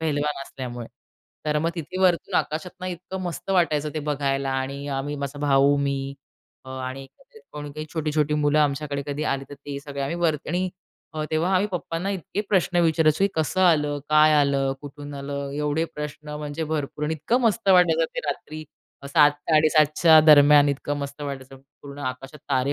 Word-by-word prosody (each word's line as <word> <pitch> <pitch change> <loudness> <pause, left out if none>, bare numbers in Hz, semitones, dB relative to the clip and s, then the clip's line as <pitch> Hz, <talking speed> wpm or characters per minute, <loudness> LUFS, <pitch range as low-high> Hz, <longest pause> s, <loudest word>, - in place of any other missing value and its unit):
पहलवान 150 -2 -1
असल्यामुळे. 125 -3 -7 0.6
तर 150 0 +1
मग 165 +2 0
तिथे 170 +2 -6
वरतून 180 -3 +2
आकाशातून 175 +4 -4
इतकं 185 +2 -6
मस्त 175 +1 -5
वाटायचं 155 -5 +1
ते - - -1
बघायला 140 -1 -1
आणि 135 +2 -3
अ, 140 - -2
आम्ही 145 +2 -3
माझा 140 0 -5
भाऊ 140 0 +4
मी 140 -1 -2 0.5
अ, - - -12
आणि 130 +1 -6 0.5
कोणी 145 -1 -7
काही 155 +1 -6
छोटी-छोटी 150 -2 0
मुलं 150 0 +2
आमच्याकडे 145 -1 0
कधी 145 +1 -3
आली, 135 -2 -1
तर - - -7
ते 140 0 -7
सगळे 140 -1 -7
आम्ही 140 +5 -2
वर 170 -3 +2
आणि 180 +3 0 0.5
अ, 155 -1 -2
तेव्हा 165 +4 +1
आम्ही 185 +3 +3
पप्पांना 175 +1 -3
इतके 195 +1 -3
प्रश्न 185 -2 +1
विचारायचो, 160 +1 +3
की - - +3
कसं 160 +4 0
आलं? 150 -5 +3
काय 155 0 +5
आलं? 140 -2 +2
कुठून 145 0 -9
आलं? 140 0 -5
एवढे 150 +2 0
प्रश्न 150 0 -7
म्हणजे 150 +2 -4
भरपूर 150 -1 -3
आणि 155 +2 -1
इतकं 190 - 0
मस्त 230 -3 +1
वाटायचं 190 - +5
ते - - -2
रात्री 155 0 -5 0.4
7-7:30 155 +1 +4
च्या 160 -2 +7
दरम्यान, 145 -1 +7
इतकं 145 +1 -2
मस्त 140 +1 -6
वाटायचं. 135 -2 -7 0.3
पूर्ण 140 0 -10
आकाशात 135 +2 -6
तारे 135 +1 +1
150 Hz, 175 wpm, -24 LUFS, 140-160 Hz, 0.6 s, च्या